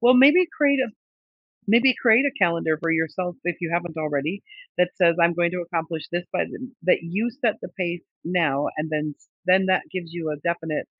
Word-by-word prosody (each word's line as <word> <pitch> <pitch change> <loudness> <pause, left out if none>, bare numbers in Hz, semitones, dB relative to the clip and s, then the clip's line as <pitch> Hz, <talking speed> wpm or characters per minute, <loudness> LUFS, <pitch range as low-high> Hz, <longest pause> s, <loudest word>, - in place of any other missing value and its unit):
Well, 245 +2 +6
maybe 295 +8 +7
create 280 -2 +3
a 260 - 0 0.8
maybe 240 +5 +5
create 235 +3 +5
a - - +2
calendar 170 -3 +2
for 165 0 +1
yourself, 165 +2 -2
if 175 -2 -1
you 170 - -2
haven't 170 -1 -2
already, 155 +4 -2 0.4
that 180 0 +3
says, 170 -3 +4
"I'm 170 0 +4
going 170 0 +1
to 180 -1 -2
accomplish 165 -2 -4
this 175 0 -2
by - - +1
the" 255 0 -9
that 180 - +3
you 200 +8 -2
set 240 -3 0
the - - -7
pace 175 -1 -2 0.2
now 160 -5 +1
and 155 +1 -3
then 150 -1 -2
s - - -30 0.2
then 190 +1 +4
that 185 - +2
gives 170 -3 -6
you 165 -2 -4
a 150 - -3
definite 165 -3 -2
175 Hz, 205 wpm, -24 LUFS, 165-205 Hz, 0.8 s, maybe